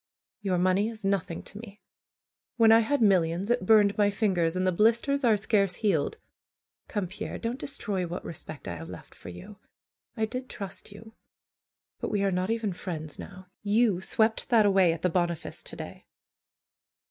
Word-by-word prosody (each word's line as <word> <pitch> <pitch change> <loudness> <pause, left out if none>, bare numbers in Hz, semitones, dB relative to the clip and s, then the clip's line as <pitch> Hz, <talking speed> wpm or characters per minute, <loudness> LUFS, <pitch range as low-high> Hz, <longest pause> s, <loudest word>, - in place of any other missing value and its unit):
Your 190 -3 0
money 185 +4 +2
is 220 -3 -9
nothing 195 -4 -1
to 205 - -10
me. 215 -2 -11 0.8
When 225 -1 +6
I 225 - +8
had 235 +3 +1
millions 185 0 +2
it 240 -6 0
burned 210 -2 +5
my 205 -1 +5
fingers, 185 -5 +1
and 185 0 0
the 185 - +3
blisters 235 +9 +2
are 225 -3 +4
scarce 200 -2 +1
healed. 175 -10 0 0.7
Come, 205 -3 -2
Pierre, 185 +3 -6
don't 235 +3 -3
destroy 200 -9 -3
what 175 - -6
respect 155 -2 -8
I 85 - -4
have 80 +1 -9
left 90 - -11
for - - -11
you. 140 - -11 0.6
I 220 - +1
did 250 +3 -6
trust 200 0 -7
you; 220 +2 -13 0.9
but - - -3
we 205 -1 0
are 195 - +2
not 185 +2 -1
even 225 -4 -1
friends 160 -4 -6
now. 185 -1 -10
You 205 -2 +2
swept 220 +3 0
that 225 -4 +5
away 190 -4 +5
at 165 0 -5
the 180 - +3
Boniface 170 -2 -2
to - - -8
day." - - -9
200 Hz, 180 wpm, -28 LUFS, 180-220 Hz, 0.9 s, I